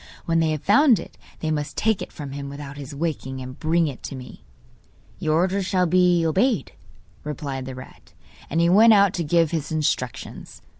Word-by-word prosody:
When 165 0 +2
they 160 -1 +2
have 155 -2 -3
found 240 +3 +5
it 170 - -9 0.3
they 155 - -1
must 150 -1 -3
take 220 -3 +1
it - - -6
from 145 -4 -8
him 140 0 -6
without 140 0 -8
his 140 0 -8
waking, 140 -4 -3
and 130 0 -9
bring 165 +1 +2
it 140 -5 -5
to - - -6
me.' 125 -1 -11 0.8
'Your 155 0 0
orders 185 +3 +1
shall 185 -2 +2
be 180 -1 +3
obeyed,' 195 - +1 0.5
replied 140 -3 -5
the 130 - -6
rat. 130 - -13 0.4
And 165 - 0
he 170 - +4
went 220 +6 +7
out 200 -2 +5
to 170 - -2
give 165 0 +2
his 160 -2 -3
instructions. 145 -6 -3
160 Hz, 195 wpm, -23 LUFS, 140-180 Hz, 0.8 s, went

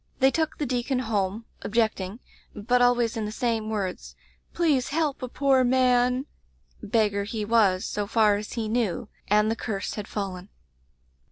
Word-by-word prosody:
They 265 0 +4
took 315 0 -1
the 295 - -2
deacon 255 +1 -1
home, 220 -2 -1 0.2
ob 210 - -6
jecting, 215 -3 0 0.4
but 245 +4 +1
always 240 -2 +3
in 220 -2 -2
the 210 - -4
same 225 -2 -1
words, 200 -4 -4 0.4
'Please 295 -7 +1
help 300 -2 -1
a 255 - -3
poor 265 0 +2
man!' 250 0 +3 0.6
Beggar 205 -2 +1
he 215 0 -4
was, 205 -4 +3
so 205 -1 -3
far 215 -2 +4
as 210 +1 -6
he 225 -2 -2
knew, 220 -4 -1 0.2
and 210 +1 +3
the - - 0
curse 205 -4 -4
had 210 -2 -6
fallen. 190 -2 -5
225 Hz, 165 wpm, -26 LUFS, 210-250 Hz, 0.6 s, They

